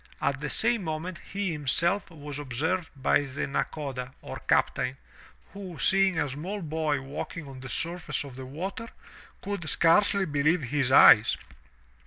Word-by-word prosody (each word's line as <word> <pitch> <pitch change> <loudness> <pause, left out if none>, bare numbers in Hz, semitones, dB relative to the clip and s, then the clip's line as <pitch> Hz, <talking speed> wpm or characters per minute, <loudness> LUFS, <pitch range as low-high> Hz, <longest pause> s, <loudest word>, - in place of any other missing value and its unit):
At 140 -1 0
the 150 0 -4
same 230 +3 +2
moment 165 +2 -4
he 200 -2 -3
himself 165 +7 +1
was 150 -3 -8
observed 160 +6 -2
by 135 +1 +2
the 140 -1 -4
Nakoda, 135 -2 -3
or - - -7
captain, 125 +2 +1 0.6
who 190 -4 -8
seeing 190 +5 +3
a 155 -2 +1
small 175 +9 -5
boy 155 -2 -1
walking 140 +3 -6
on 135 -1 -10
the 130 0 -8
surface 170 -1 -1
of 135 -3 -10
the 130 0 -8
water, 190 - -5 0.6
could 200 -6 -3
scarcely 200 +4 +3
believe 150 +1 +1
his 130 0 +1
eyes. 110 -5 +7
155 Hz, 150 wpm, -27 LUFS, 135-180 Hz, 0.6 s, eyes